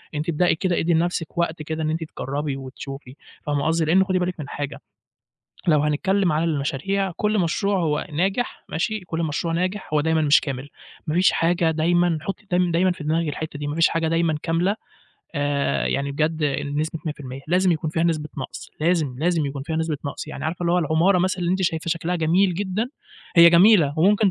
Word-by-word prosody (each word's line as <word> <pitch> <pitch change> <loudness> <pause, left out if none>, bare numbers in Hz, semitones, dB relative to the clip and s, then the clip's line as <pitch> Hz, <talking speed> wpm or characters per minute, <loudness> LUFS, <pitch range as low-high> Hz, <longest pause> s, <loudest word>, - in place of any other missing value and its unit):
أنتِ 150 +3 -2
ابدئي 170 +2 +2
كده، 175 +1 0
ادي 170 +1 +1
لنفسِك 170 0 -1
وقت 170 -2 -1
كده 160 +1 -4
إن 155 - 0
أنتِ 160 +1 -2
تجرّبي 145 -1 -4
وتشوفي، 135 0 -9 0.3
فاهمة 145 -1 -1
قصدي، 165 0 +2
لإن 180 +5 +4
خُدي 185 -1 0
بالِك 180 -1 -2
من 145 -2 -6
حاجة، 145 0 -5 0.9
لو 155 -3 +5
هنتكلّم 175 +5 +1
على 155 +2 +1
المشاريع، 165 +5 -1
كلّ 210 0 +1
مشروع 195 +3 +1
هو 150 -3 0
ناجح، 195 +10 -1
ماشي، 215 +7 -2
كلّ 170 -2 -4
مشروع 165 +1 -1
ناجح 185 +4 -2
هو 150 - +4
دايمًا 160 +1 +1
مش 145 -1 +5
كامل، 135 -1 -5 0.4
ما 155 - -1
فيش 180 +2 +4
حاجة 170 0 +2
دايمًا 170 +1 +2
حطي 195 +5 -6
دايم 180 0 +2
دايمًا 180 +3 +3
في 175 -4 -9
دماغِك 160 +2 0
الحتّة 150 0 -5
دي، 145 - -4
ما 145 - -3
فيش 165 0 +4
حاجة 165 -1 0
دايمًا 165 -1 +1
كاملة 175 +5 +1 0.6
آآ، 145 0 0
يعني 140 0 -1
بجد 155 +2 0 0.3
بنسبة 150 +3 -2
100%، 135 -3 -6
لازم 180 +1 +3
يكون 155 -1 -2
فيها 165 +1 0
نسبة 155 -3 0
نقص، 130 - -7
لازم، 155 -5 +1
لازم 165 -1 +1
يكون 140 0 -5
فيها 160 +2 -3
نسبة 160 -1 -1
نقص، 140 - -5
يعني - - -6
عارفة 165 +3 -3
اللي 170 - +1
هو 180 - +3
العمارة 170 +4 +3
مثلًا 185 +1 0
اللي 175 -1 0
أنتِ 190 +1 0
شايفة 165 -1 -1
شكلها 170 +1 -1
جميل 175 +3 +2
جدًا، 205 +5 -2 0.5
هي 170 0 +9
جميلة، 170 -4 +6
وممكن 200 +4 +4
165 Hz, 200 wpm, -23 LUFS, 150-180 Hz, 0.9 s, هي